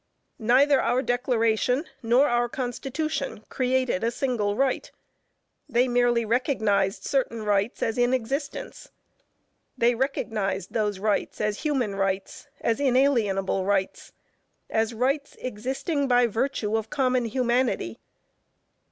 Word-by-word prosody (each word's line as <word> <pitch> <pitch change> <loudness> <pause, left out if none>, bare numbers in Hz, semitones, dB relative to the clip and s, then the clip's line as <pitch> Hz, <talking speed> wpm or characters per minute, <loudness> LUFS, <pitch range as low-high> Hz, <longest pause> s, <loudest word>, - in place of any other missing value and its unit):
Neither 260 +5 +4
our 255 +2 +1
Declaration, 245 +2 +1 0.2
nor 245 +5 +4
our 240 -1 +1
Constitution 270 +1 -3
created 255 -5 0
a 230 - +2
single 235 -5 -1
right; 265 +2 0 0.8
they 250 0 +3
merely 240 -1 +2
recognized 215 -5 +1
certain 240 -5 -1
rights 205 +1 0
as 225 +1 -1
in 245 0 +3
existence. 270 +4 -3 0.9
They 235 +1 +3
recognized 215 -7 -2
those 210 -3 0
rights 210 +1 -1
as 210 -1 -1
human 265 -9 0
rights, 195 0 -2
as 230 +2 0
inalienable 235 -9 +2
rights, 195 -1 -1 0.6
as 220 +1 +1
rights 275 +5 -1
existing 265 - -2
by 245 -1 +4
virtue 225 -1 -1
of 220 0 -2
common 255 -3 +1
humanity. 240 - 0
240 Hz, 115 wpm, -26 LUFS, 215-260 Hz, 0.9 s, Neither